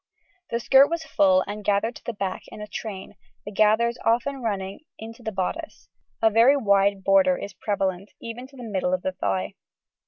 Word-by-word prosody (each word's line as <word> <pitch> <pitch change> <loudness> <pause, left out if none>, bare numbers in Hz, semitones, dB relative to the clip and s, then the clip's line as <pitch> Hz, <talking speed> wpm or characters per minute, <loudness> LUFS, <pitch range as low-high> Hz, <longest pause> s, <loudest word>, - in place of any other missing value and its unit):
The 235 - -1
skirt 270 +3 +6
was 335 0 -2
full 190 -10 +3
and 205 +1 -6
gathered 205 +4 +1
to - - -19
the 235 - -4
back 195 -3 -3
in - - -11
a 210 - -5
train, 205 -2 -7 0.3
the 205 - -6
gathers 220 +3 +2
often 250 +4 +1
running 200 -4 -3 0.2
into 225 +2 -10
the 220 - -4
bodice; 220 - -4 0.3
a 220 - +5
very 235 +6 +5
wide 200 -4 +2
border 190 -2 +4
is 200 - -7
prevalent, 195 -1 -2
even 235 +2 -7
to 275 - -19
the 250 - -9
middle 190 -4 0
of 180 - -8
the 190 - -1
thigh. 95 - -2
210 Hz, 190 wpm, -25 LUFS, 195-235 Hz, 0.3 s, skirt